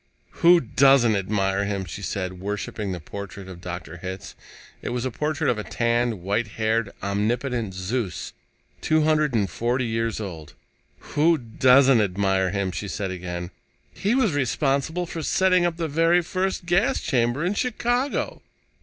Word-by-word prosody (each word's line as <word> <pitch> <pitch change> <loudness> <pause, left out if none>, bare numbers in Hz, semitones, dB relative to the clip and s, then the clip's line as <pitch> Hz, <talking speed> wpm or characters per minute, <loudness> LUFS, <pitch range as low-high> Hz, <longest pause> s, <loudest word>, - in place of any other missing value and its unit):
"Who 175 +1 +7
doesn't 135 -3 +4
admire 95 0 0
him?" 100 -2 -2
she 100 - -7
said, 95 -2 -4
worshiping 105 0 -3
the 90 - -4
portrait 100 +3 -8
of 90 -2 -10 0.4
Hitz. 95 0 -6 0.5
It - - -4
was 120 0 -2
the 130 - -2
portrait 150 +4 -1
of 115 - +1
a - - -3
tanned, 115 -4 0
white 105 +4 0
haired, 110 -1 +1
omnipotent 110 +1 -1
Zeus, 95 0 -3 0.5
two 155 0 +2
hundred 155 -4 +2
and 105 -3 +2
forty 120 +7 -1
years 115 -1 -1
old. 85 -8 -7 0.6
"Who 160 +3 +4
doesn't 130 +1 +4
admire 95 -1 +1
him?" 100 -1 -1
she 100 - -5
said 100 -1 -3
again. 90 -1 -5 0.4
"He 210 +5 0
was 225 - +2
responsible 140 +5 0
for 165 -1 -5
setting 185 +1 +3
up 170 -1 -4
the 165 -1 -1
very 165 +4 +3
first 185 +1 -2
gas 195 +10 +2
chamber 120 +4 0
in 185 - +1
Chicago." 245 +4 -1
115 Hz, 155 wpm, -24 LUFS, 100-155 Hz, 0.6 s, Who